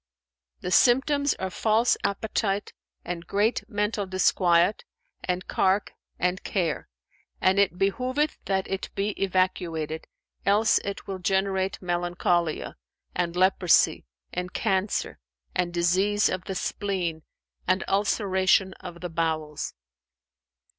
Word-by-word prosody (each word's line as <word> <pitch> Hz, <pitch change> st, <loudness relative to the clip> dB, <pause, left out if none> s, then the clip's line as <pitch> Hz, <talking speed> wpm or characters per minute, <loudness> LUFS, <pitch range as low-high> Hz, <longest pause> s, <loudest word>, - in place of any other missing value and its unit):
"The 180 Hz, -, -3 dB
symptoms 285 Hz, +6 st, +4 dB
are 190 Hz, -1 st, -4 dB
false 220 Hz, +4 st, +3 dB
appetite 200 Hz, 0 st, -1 dB, 0.3 s
and 170 Hz, -1 st, -5 dB
great 210 Hz, +4 st, +1 dB
mental 210 Hz, -1 st, -1 dB
disquiet 185 Hz, 0 st, +3 dB, 0.4 s
and 180 Hz, 0 st, -2 dB
cark 195 Hz, +2 st, +1 dB, 0.2 s
and 180 Hz, +1 st, 0 dB
care; 175 Hz, -6 st, -1 dB, 0.5 s
and 190 Hz, +1 st, +3 dB
it 200 Hz, -3 st, +2 dB
behoveth 255 Hz, +10 st, 0 dB
that 190 Hz, -1 st, 0 dB
it 195 Hz, 0 st, -3 dB
be 200 Hz, +1 st, 0 dB
evacuated, 175 Hz, -4 st, -1 dB, 0.4 s
else 210 Hz, +3 st, +4 dB
it 200 Hz, 0 st, -6 dB
will 190 Hz, -1 st, -5 dB
generate 190 Hz, +1 st, 0 dB
melancholia[FN#402] 175 Hz, -2 st, 0 dB, 0.4 s
and 175 Hz, -1 st, -1 dB
leprosy 185 Hz, -, +3 dB, 0.3 s
and 180 Hz, 0 st, -3 dB
cancer 190 Hz, +2 st, 0 dB, 0.3 s
and 180 Hz, -1 st, 0 dB
disease 185 Hz, +5 st, +2 dB
of 185 Hz, -1 st, -3 dB
the 190 Hz, -, -4 dB
spleen 180 Hz, -5 st, -2 dB, 0.5 s
and 185 Hz, +1 st, +2 dB
ulceration 195 Hz, -1 st, +2 dB
of 175 Hz, -2 st, -9 dB
the 180 Hz, -, -4 dB
bowels." 160 Hz, -, -2 dB
190 Hz, 115 wpm, -26 LUFS, 175-200 Hz, 0.5 s, symptoms